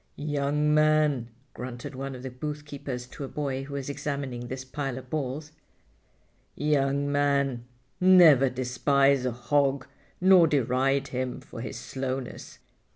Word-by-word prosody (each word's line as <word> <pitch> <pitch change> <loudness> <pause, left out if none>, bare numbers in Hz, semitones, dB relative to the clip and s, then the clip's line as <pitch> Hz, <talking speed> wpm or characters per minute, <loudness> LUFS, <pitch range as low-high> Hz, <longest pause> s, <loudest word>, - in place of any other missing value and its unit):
"Young 150 0 0
man," 155 -5 +3 0.3
grunted 120 -1 -7
one 135 0 -5
of 125 - -10
the 130 - -5
boothkeepers 140 -2 -6
to - - -7
a - - -4
boy 135 -2 -3
who 140 0 -7
was 140 -2 -4
examining 140 -4 -4
this 130 +1 -6
pile 135 -1 -4
of 130 -1 -10
balls, 150 +1 -3 1.0
"young 140 -1 +1
man, 140 -4 +1 0.3
never 170 -8 +7
despise 130 +1 +2
a - - 0
hog 135 +3 +1 0.3
nor 185 -2 +6
deride 135 0 +1
him 130 -1 -3
for 115 - -10
his 125 - -6
slowness. 130 -1 -5
140 Hz, 135 wpm, -27 LUFS, 130-145 Hz, 1.0 s, never